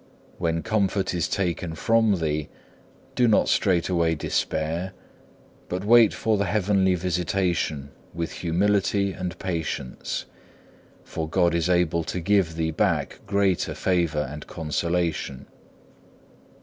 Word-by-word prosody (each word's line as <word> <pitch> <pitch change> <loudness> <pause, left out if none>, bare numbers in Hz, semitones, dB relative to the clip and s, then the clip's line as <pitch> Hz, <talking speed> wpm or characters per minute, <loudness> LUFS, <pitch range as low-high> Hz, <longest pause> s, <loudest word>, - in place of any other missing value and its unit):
When 80 0 0
comfort 100 -3 0
is 85 -2 0
taken 90 -3 -2
from 115 +2 +3
thee, 75 -3 -2 0.6
do 125 - +3
not 110 - +4
straightway 85 -3 +2
despair, 80 +4 -2 0.8
but 90 +2 -3
wait 115 0 +7
for 110 -2 0
the 100 - +1
heavenly 95 -1 +2
visitation 85 -5 -1 0.2
with 85 0 -4
humility 100 +3 +1
and 90 0 -5
patience, 80 -7 -4 0.8
for 80 -1 -5
God 85 0 +2
is 85 +1 0
able 85 -2 +2
to 90 - -3
give 90 -2 +2
thee 80 0 -1
back 80 - 0
greater 100 -3 +1
favour 85 -5 0
and 75 +2 -8
consolation. 80 -3 -2
90 Hz, 115 wpm, -25 LUFS, 80-95 Hz, 0.8 s, wait